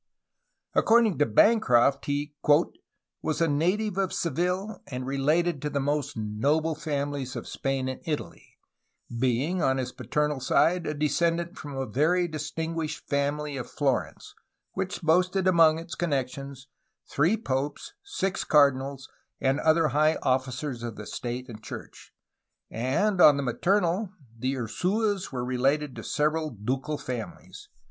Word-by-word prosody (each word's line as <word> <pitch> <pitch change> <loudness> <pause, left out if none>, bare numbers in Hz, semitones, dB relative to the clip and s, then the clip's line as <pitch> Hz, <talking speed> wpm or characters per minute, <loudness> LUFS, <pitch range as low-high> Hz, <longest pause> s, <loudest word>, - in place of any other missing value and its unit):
^' - - -63 0.7
According 225 -6 +4
to 145 - +4
Bancroft 140 - +4
he 145 +1 -2 0.9
"was 155 -1 -2
a 165 - +3
native 185 +7 0
of 190 -2 0
Seville, 180 +5 -2
and 125 -1 -5
related 150 +4 +1
to 150 - -2
the 145 - -1
most 145 -1 -1
noble 140 +10 0
families 145 -3 -3
of - - -6
Spain 135 -1 -2
and 130 - -5
Italy, 155 -3 -5 0.6
being 130 +9 +1
on 130 0 +2
his 125 -1 -3
paternal 150 0 -1
side 170 +6 +2
a 150 - -2
descendant 170 +4 0
from 145 -5 -8
a 135 - -1
very 160 - +2
distinguished 160 0 -4
family 145 0 -1
of 125 - -6
Florence, 140 -3 -2 0.4
which 190 0 -4
boasted 180 +3 +2
among 165 -3 +5
its 165 +1 -7
connections 135 -3 -3 0.4
three 165 +10 +2
popes, 145 - -3
six 195 - -2
cardinals, 140 -2 +2 0.3
and 135 +1 +1
other 160 0 +3
high 155 +3 +3
ojSicers 130 0 -1
of 115 -2 -5
the 105 - -8
state 125 +3 -5
and 110 -4 -10
church; - - -10 0.6
and 170 - +1
on 145 -2 +8
the 140 - -1
maternal, 180 - +1 0.3
the 130 +4 -2
Ursuas 190 - -1
were 125 -2 -3
related 135 +3 0
to - - -7
several 155 +1 0
ducal 130 +6 -3
families. 125 -5 -7
150 Hz, 140 wpm, -27 LUFS, 130-170 Hz, 0.9 s, on